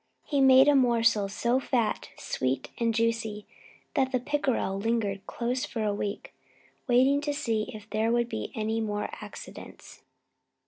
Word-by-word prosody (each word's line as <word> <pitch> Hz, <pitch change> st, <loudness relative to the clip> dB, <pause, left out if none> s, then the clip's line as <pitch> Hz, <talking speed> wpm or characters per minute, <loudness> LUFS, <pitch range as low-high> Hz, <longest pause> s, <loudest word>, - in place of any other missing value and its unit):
He 285 Hz, -2 st, +1 dB
made 265 Hz, +1 st, +7 dB
a 290 Hz, -, +6 dB
morsel 230 Hz, -6 st, +3 dB
so 235 Hz, +5 st, +1 dB
fat, 240 Hz, -4 st, -1 dB
sweet, 130 Hz, 0 st, -2 dB
and 230 Hz, -1 st, +2 dB
juicy 225 Hz, -2 st, -1 dB, 0.5 s
that 265 Hz, -3 st, +1 dB
the 255 Hz, -, +1 dB
pickerel 260 Hz, -7 st, -1 dB
lingered 205 Hz, -3 st, -1 dB
close 245 Hz, +2 st, -2 dB
for 225 Hz, -, -3 dB
a 210 Hz, -1 st, +1 dB
week, 205 Hz, 0 st, -4 dB, 0.5 s
waiting 260 Hz, +3 st, +4 dB
to 290 Hz, 0 st, -2 dB
see 225 Hz, -7 st, -1 dB
if 215 Hz, 0 st, -10 dB
there 220 Hz, +1 st, 0 dB
would 240 Hz, 0 st, +2 dB
be 225 Hz, -2 st, -5 dB
any 220 Hz, 0 st, -1 dB
more 210 Hz, -1 st, -2 dB
accidents. -, -, -11 dB
230 Hz, 150 wpm, -28 LUFS, 215-255 Hz, 0.5 s, made